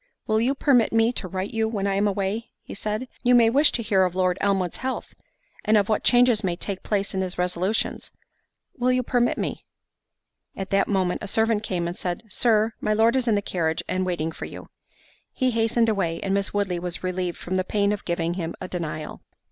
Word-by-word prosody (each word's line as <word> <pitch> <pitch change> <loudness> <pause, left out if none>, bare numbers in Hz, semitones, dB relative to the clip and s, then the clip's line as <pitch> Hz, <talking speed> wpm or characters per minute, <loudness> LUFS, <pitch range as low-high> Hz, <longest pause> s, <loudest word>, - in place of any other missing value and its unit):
—"Will 220 0 +2
you 260 +4 +1
permit 260 -5 +3
me 225 +1 +3
to 195 - -3
write 185 +2 -4
to - - -10
you 220 0 +1
when 210 -3 -2
I 200 - +1
am 200 +2 +2
away?" 205 +3 -2 0.2
said 210 +2 -2
he; 255 - -8 0.2
"You 250 - +7
may 230 -2 +5
wish 290 +4 +5
to 235 - -1
hear 195 -3 +3
of 180 -1 -1
Lord 185 -1 +1
Elmwood's 195 -3 0
health, 260 0 -4 0.5
and 215 0 +4
of 205 0 +1
what 215 - +1
changes 245 -3 +4
may 180 -2 0
take 190 +2 -4
place 200 -1 -1
in 190 - -1
his 185 -1 -3
resolutions.—Will 185 +7 -3
you 255 0 +1
permit 245 0 +1
me?" - - -3 0.9
At 195 - -6
that 195 - +3
moment 190 -3 0
a 210 - -5
servant 220 +1 +2
came 180 -5 -2
and 175 - -4
said, 175 +1 -4
"Sir, 220 +1 +2
my 215 - +1
Lord 225 +3 +3
is 260 -2 +1
in 225 - +3
the 205 - 0
carriage, 165 -4 -1
and 185 0 0
waiting 170 -3 -1
for - - -7
you." - - -10 0.6
He 255 -1 0
hastened 230 0 +2
away, 190 -6 0
and 195 - -1
Miss 200 0 0
Woodley 195 -4 -1
was 175 -1 -4
relieved 185 -1 -2
from 180 - -6
the 185 0 +1
pain 200 +1 +1
of 205 -1 -3
giving 170 -1 -1
him 170 -2 -4
a 185 - -5
denial. 155 -4 -5
200 Hz, 220 wpm, -24 LUFS, 185-225 Hz, 0.9 s, You